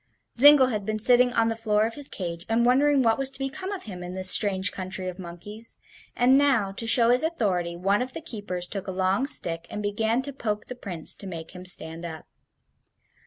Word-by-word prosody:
Zingle 275 Hz, 0 st, +7 dB
had 210 Hz, -4 st, -3 dB
been 215 Hz, +2 st, -3 dB
sitting 245 Hz, +3 st, +4 dB
on 230 Hz, -1 st, +2 dB
the 225 Hz, -, -1 dB
floor 215 Hz, -1 st, +1 dB
of 225 Hz, -, -4 dB
his 285 Hz, +1 st, +1 dB
cage 170 Hz, -3 st, -6 dB
and 230 Hz, +1 st, +2 dB
wondering 275 Hz, +2 st, +3 dB
what 225 Hz, 0 st, +2 dB
was 270 Hz, -1 st, +1 dB
to 270 Hz, -, -15 dB
become 310 Hz, +9 st, -5 dB
of 400 Hz, -, -6 dB
him 185 Hz, -5 st, -9 dB
in 180 Hz, 0 st, -7 dB
this 185 Hz, 0 st, +3 dB
strange 195 Hz, -2 st, +3 dB
country 185 Hz, 0 st, -4 dB
of 185 Hz, +1 st, -7 dB
monkeys, 200 Hz, +6 st, -8 dB, 0.4 s
and 260 Hz, +3 st, +4 dB
now, 255 Hz, -9 st, +2 dB
to 225 Hz, +4 st, -6 dB
show 235 Hz, +1 st, +4 dB
his 250 Hz, -, +4 dB
authority, 195 Hz, -, -1 dB
one 195 Hz, +4 st, +1 dB
of 255 Hz, +1 st, -5 dB
the -, -, -6 dB
keepers 205 Hz, -, -2 dB
took 195 Hz, +1 st, -6 dB
a -, -, -3 dB
long 190 Hz, +7 st, 0 dB
stick 170 Hz, -, +1 dB
and 210 Hz, -, -6 dB
began 220 Hz, +4 st, -1 dB
to 280 Hz, +1 st, -6 dB
poke 210 Hz, -5 st, -4 dB
the 250 Hz, -, -8 dB
Prince 180 Hz, -9 st, -3 dB
to 200 Hz, -, -9 dB
make 165 Hz, -3 st, -8 dB
him 180 Hz, 0 st, -11 dB
stand 165 Hz, -2 st, -2 dB
up. 160 Hz, -2 st, -8 dB
210 Hz, 220 wpm, -25 LUFS, 185-250 Hz, 0.4 s, Zingle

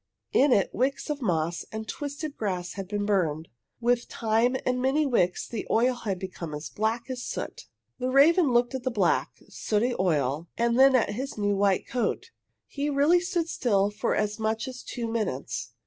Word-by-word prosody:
In 280 Hz, +1 st, +5 dB
it 200 Hz, -5 st, +3 dB
wicks 270 Hz, +4 st, -1 dB
of 290 Hz, -1 st, -4 dB
moss 170 Hz, -5 st, 0 dB
and 220 Hz, 0 st, -5 dB
twisted 285 Hz, +6 st, -5 dB
grass 185 Hz, -4 st, -3 dB
had 195 Hz, -2 st, -6 dB
been 205 Hz, +1 st, -2 dB
burned. 165 Hz, -6 st, 0 dB, 0.3 s
With 240 Hz, 0 st, +1 dB
time 230 Hz, +3 st, +1 dB
and 250 Hz, 0 st, 0 dB
many 275 Hz, +4 st, +2 dB
wicks 180 Hz, -10 st, +1 dB
the 230 Hz, -, -5 dB
oil 245 Hz, +3 st, +3 dB
had 210 Hz, -6 st, -3 dB
become 180 Hz, -4 st, -6 dB
as 150 Hz, +2 st, -7 dB
black 220 Hz, +3 st, -1 dB
as 250 Hz, -1 st, -4 dB
soot. -, -, -6 dB, 0.3 s
The 255 Hz, 0 st, -1 dB
raven 290 Hz, +3 st, +5 dB
looked 240 Hz, +1 st, +2 dB
at 260 Hz, -, -3 dB
the 255 Hz, -, -1 dB
black, 200 Hz, -8 st, +1 dB, 0.2 s
sooty 225 Hz, +4 st, 0 dB
oil 155 Hz, -3 st, 0 dB
and 235 Hz, +1 st, +2 dB
then 270 Hz, 0 st, +7 dB
at 235 Hz, -4 st, +2 dB
his 260 Hz, +5 st, -5 dB
new 205 Hz, -1 st, +1 dB
white 195 Hz, -1 st, +2 dB
coat. 245 Hz, -1 st, -2 dB, 0.3 s
He 285 Hz, +1 st, -3 dB
really 290 Hz, +5 st, +4 dB
stood 350 Hz, -2 st, -1 dB
still 205 Hz, -9 st, +1 dB
for 210 Hz, +1 st, -1 dB
as 210 Hz, +1 st, -1 dB
much 220 Hz, +2 st, -1 dB
as 255 Hz, -1 st, -7 dB
two 235 Hz, -2 st, -5 dB
minutes. 215 Hz, -, -3 dB
230 Hz, 185 wpm, -27 LUFS, 195-260 Hz, 0.3 s, then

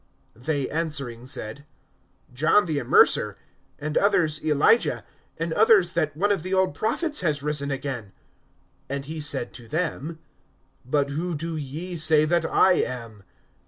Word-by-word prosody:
(19)They 140 Hz, +3 st, -2 dB
answering 140 Hz, -7 st, -3 dB
said: 120 Hz, +1 st, -5 dB, 0.7 s
John 160 Hz, +10 st, +3 dB
the 155 Hz, -4 st, -1 dB
Immerser; 120 Hz, -, +4 dB, 0.4 s
and 150 Hz, +1 st, -5 dB
others, 160 Hz, -6 st, +1 dB
Elijah; 155 Hz, +9 st, +2 dB, 0.3 s
and 165 Hz, 0 st, -2 dB
others, 205 Hz, -4 st, +4 dB
that 150 Hz, -4 st, -1 dB
one 205 Hz, +4 st, +2 dB
of 200 Hz, -, +1 dB
the 185 Hz, +3 st, -2 dB
old 190 Hz, -5 st, +2 dB
prophets 290 Hz, -, 0 dB
has 150 Hz, -5 st, -1 dB
risen 145 Hz, -1 st, -2 dB
again. 135 Hz, -7 st, -5 dB, 0.8 s
(20)And 140 Hz, 0 st, -4 dB
he 155 Hz, +2 st, -6 dB
said 145 Hz, -4 st, +1 dB
to 120 Hz, -2 st, -11 dB
them: 160 Hz, +1 st, -3 dB, 0.7 s
But 140 Hz, +2 st, 0 dB
who 170 Hz, +4 st, -3 dB
do 165 Hz, +2 st, -4 dB
ye 155 Hz, +5 st, -5 dB
say 155 Hz, -1 st, +4 dB
that 170 Hz, +1 st, +1 dB
I 185 Hz, -1 st, +4 dB
am? 115 Hz, -4 st, -6 dB
155 Hz, 145 wpm, -24 LUFS, 140-170 Hz, 0.8 s, Immerser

